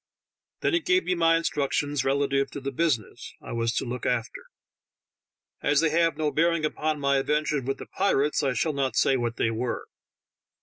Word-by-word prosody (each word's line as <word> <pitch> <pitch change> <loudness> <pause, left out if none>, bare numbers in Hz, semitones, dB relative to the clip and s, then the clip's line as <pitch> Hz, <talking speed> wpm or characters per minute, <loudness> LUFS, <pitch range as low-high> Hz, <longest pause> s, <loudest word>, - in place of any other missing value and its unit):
Then - - +1
he 335 - +4
gave 365 +2 +2
me 180 - 0
my 165 -1 +3
instructions 145 -3 -1
relative 140 0 +1
to - - -7
the 140 0 -4
business 135 - -2
I - - -10
was 115 0 0
to - - -1
look 125 +1 -4
after: 120 -2 -2 1.2
as 145 -1 +3
they 160 -1 +2
have 165 -2 +2
no 155 -1 0
bearing 165 0 +2
upon 155 0 -1
my 140 -1 +2
adventure 150 +1 0
with 135 +2 -3
the - - -8
pirates, 150 -7 +1
I 135 -2 0
shall 155 +4 0
not 135 -2 -1
say 135 - +3
what 120 -2 -2
they 115 - 0
were. 120 +2 -3
145 Hz, 185 wpm, -26 LUFS, 135-160 Hz, 1.2 s, he